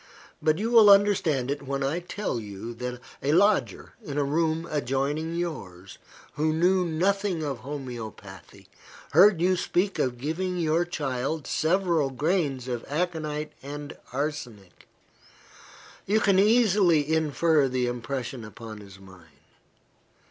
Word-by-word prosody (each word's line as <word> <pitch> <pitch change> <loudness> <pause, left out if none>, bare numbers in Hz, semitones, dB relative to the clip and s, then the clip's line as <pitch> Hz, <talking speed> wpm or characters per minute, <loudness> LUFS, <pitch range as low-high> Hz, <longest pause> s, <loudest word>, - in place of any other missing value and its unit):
But 155 0 +2
you 225 +4 -2
will 225 -3 +8
understand 185 -10 +4
it 145 - -3
when 140 0 -3
I 145 +6 0
tell 180 - -4
you, 105 +2 -7
that 125 +1 -5 0.2
a 145 +2 +1
lodger, 180 - +2
in 145 -1 -6
a 145 - +2
room 160 +3 0
adjoining 145 +3 -1
yours, 100 - -6 0.3
who 155 +1 0
knew 180 +3 +3
nothing 185 +1 0
of 140 -5 -3
homoeopathy, 115 - -9 0.4
heard 185 +4 +6
you 185 +1 +3
speak 185 +2 -1
of 125 -2 0
giving 175 +7 -3
your 165 0 +1
child 145 -2 -3
several 170 -3 +1
grains 145 -2 -1
of 120 -2 -3
aconite 155 -1 -3
and 145 +1 -7 0.2
arsenic. 125 - -5 1.2
You 210 +3 +3
can 200 -2 +3
easily 195 -8 +4
infer 160 -1 +2
the 125 -1 0
impression 120 0 -4
upon 110 +1 -9
his 100 -2 -13
mind. 95 -4 -16
150 Hz, 130 wpm, -26 LUFS, 125-175 Hz, 1.2 s, will